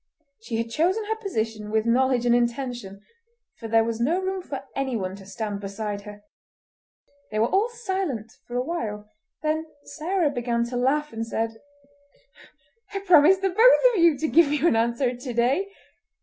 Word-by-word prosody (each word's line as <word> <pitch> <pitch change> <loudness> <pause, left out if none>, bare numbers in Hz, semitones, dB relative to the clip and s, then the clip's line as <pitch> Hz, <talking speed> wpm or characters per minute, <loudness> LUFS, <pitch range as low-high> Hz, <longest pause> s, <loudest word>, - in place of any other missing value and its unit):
She 225 0 -4
had 230 0 -3
chosen 365 - +1
her 440 +1 -1
position 225 - -3
with 220 +1 +1
knowledge 250 +1 +2
and 240 - +4
intention, 240 -4 -2 0.6
for 230 - -6
there 225 0 +4
was 230 0 -3
no 320 +9 +2
room 380 0 -2
for 275 -6 -7
anyone 230 -9 -2
to 195 -1 -13
stand 205 0 -4
beside 200 +1 -5
her. 205 0 -11 1.1
They 215 - -4
were 220 - +3
all 405 +5 +2
silent 380 - -3 0.2
for 240 - -7
a 250 - +1
while; 215 -10 -4 0.4
then 315 +1 -1 0.2
Sarah 335 -1 -1
began 240 -2 -1
to 250 - -5
laugh 285 +4 0
and 225 0 -3
said:— 225 0 -3 1.4
"I 395 - -2
promised 365 0 +5
the 385 - +3
both - - +6
of 365 - +2
you 335 -4 +5
to 315 - -1
give 315 -2 +4
you 295 +1 +1
an 230 - +3
answer 235 +2 +1
to 250 0 -6
day. 260 +12 +1
250 Hz, 175 wpm, -25 LUFS, 225-335 Hz, 1.4 s, both